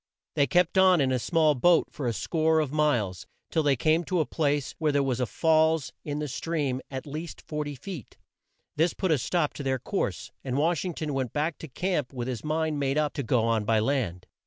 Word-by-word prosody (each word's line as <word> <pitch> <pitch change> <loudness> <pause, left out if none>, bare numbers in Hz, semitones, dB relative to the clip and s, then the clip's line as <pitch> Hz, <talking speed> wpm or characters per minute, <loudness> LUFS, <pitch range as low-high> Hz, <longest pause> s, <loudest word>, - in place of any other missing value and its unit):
They 140 - +2
kept 180 +6 +3
on 185 -2 +6
in 135 -2 +2
the 130 - +1
small 155 +3 +3
boat 170 +6 +3
for 140 -4 -4
a 120 - 0
score 160 +6 +1
of 150 -4 -1
miles, 130 -12 0 0.2
till 160 - +2
they 145 -2 +3
came 155 +6 +2
to 180 +1 0
a 155 - +2
place 145 -4 -1
where 155 -2 +2
there 140 -1 +2
was 130 -2 -1
a 125 - 0
falls 160 -2 +2
in 145 -1 -3
the 150 0 -2
stream 140 -1 -2
at 130 -1 -5
least 155 +3 -6
40 150 -2 -3
feet. 150 - -9 0.6
This 165 +3 +2
put 190 -3 0
a 150 - +3
stop 160 +3 0
to - - -7
their 135 -1 0
course, - - -3
and 130 -1 -2
Wash 160 +1 +1
ing 180 -3 -4
ton 155 -2 -3
went 130 -4 -2
back 150 +2 -1
to 160 - -7
camp 150 -1 -2
with 120 -2 -4
his 125 -4 -4
mind 155 -1 -1
made 135 0 0
up 150 -1 +1
to - - -2
go 120 -2 +1
on 115 -2 +1
by 110 +1 +2
land. 110 -7 -1
150 Hz, 230 wpm, -27 LUFS, 130-160 Hz, 0.6 s, on